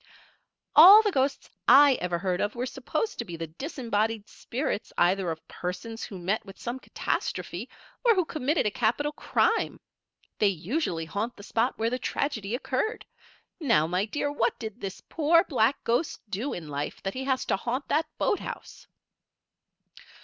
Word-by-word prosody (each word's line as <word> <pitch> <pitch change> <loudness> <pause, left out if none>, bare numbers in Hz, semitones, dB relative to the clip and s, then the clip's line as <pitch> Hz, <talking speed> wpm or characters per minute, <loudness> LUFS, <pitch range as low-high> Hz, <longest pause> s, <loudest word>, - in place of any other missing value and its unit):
"All 390 +8 +11
the 415 - +1
ghosts 275 -3 0 0.2
I 285 0 +8
ever 175 -1 -1
heard 180 0 -1
of 205 +3 -1
were 245 +1 -2
supposed 270 - -3
to - - 0
be 175 -4 -7
the 165 - -4
disembodied 220 - -2
spirits 245 -3 -4
either 180 +1 +2
of 160 -1 -6
persons 180 +6 -5
who 195 - -7
met 185 +5 -1
with 195 - -12
some 240 +2 -4
catastrophe, - - -3 0.3
or 470 -2 +5
who 365 -3 +2
committed 305 +1 0
a 210 - +1
capital 240 +8 0
crime. 450 +8 0 0.6
They 210 - +4
usually 185 - -1
haunt 205 +9 -3
the 200 - -11
spot 230 +4 0
where 225 +1 0
the 250 - -1
tragedy 235 -8 -2
occurred. 265 - -2 0.5
Now, 230 - +3
my 180 +4 0
dear, 290 +5 -2
what 235 -5 0
did 220 -3 -7
this 195 -1 -6
poor, 330 +2 +3
black 260 - +1
ghost 240 +7 0
do 230 +9 -2
in 165 -3 -6
life 145 0 -5
that 195 - -2
he 265 +1 -4
has 265 -1 0
to - - +1
haunt 245 +7 -3
that 310 +2 +2
boathouse?" 410 - -3
235 Hz, 165 wpm, -27 LUFS, 195-285 Hz, 0.6 s, All